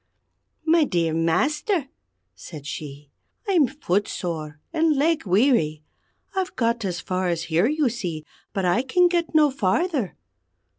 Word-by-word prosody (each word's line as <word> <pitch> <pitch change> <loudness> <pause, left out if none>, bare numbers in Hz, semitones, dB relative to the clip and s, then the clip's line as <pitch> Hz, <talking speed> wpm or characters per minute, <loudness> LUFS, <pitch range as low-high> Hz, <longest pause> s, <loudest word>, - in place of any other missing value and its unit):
"My 330 0 +5
dear 170 - 0
Master," 280 - +1 0.5
said 150 -5 -10
she, 145 -1 -7 0.4
"I'm 345 -9 +4
footsore 175 - -3
and 320 -1 +3
leg 310 -4 +1
weary. 180 - +2 0.5
I've 380 -1 -2
got 230 -1 0
as 180 -3 -2
far 185 -1 -2
as 170 -1 -1
here, 170 +5 +2
you 300 0 +1
see, 175 -10 -4 0.3
but 195 -2 -2
I 180 +7 +3
can 355 +7 +3
get 345 -2 -1
no 300 -2 +5
farther. 260 - 0
220 Hz, 135 wpm, -24 LUFS, -, 0.5 s, My